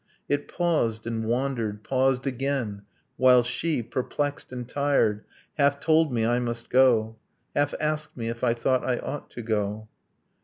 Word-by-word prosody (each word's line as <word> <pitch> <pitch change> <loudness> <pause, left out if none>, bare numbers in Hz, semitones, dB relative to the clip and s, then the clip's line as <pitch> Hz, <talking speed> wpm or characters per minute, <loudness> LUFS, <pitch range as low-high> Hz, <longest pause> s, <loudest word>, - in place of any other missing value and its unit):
It 145 0 -1
paused... 150 -11 0
and 115 -1 -2
wandered... 115 -3 -1
paused 130 +1 +1
again; 130 -6 -2 0.4
while 125 -1 +6
she, 125 +3 -1
Perplexed 145 +5 -3
and 125 -2 -6
tired, 135 -7 +1 0.4
half 140 0 +3
told 160 -1 +3
me 115 -2 +1
I 120 +1 +2
must 120 -1 -4
go, 115 -4 +4 0.4
Half 145 0 +1
asked 155 -1 -2
me 115 -2 -3
if 115 +1 -5
I 120 -2 +3
thought 130 +2 +1
I 125 -1 0
ought 145 +1 -6
to 120 - -8
go 110 -1 -2
125 Hz, 155 wpm, -26 LUFS, 115-140 Hz, 0.4 s, while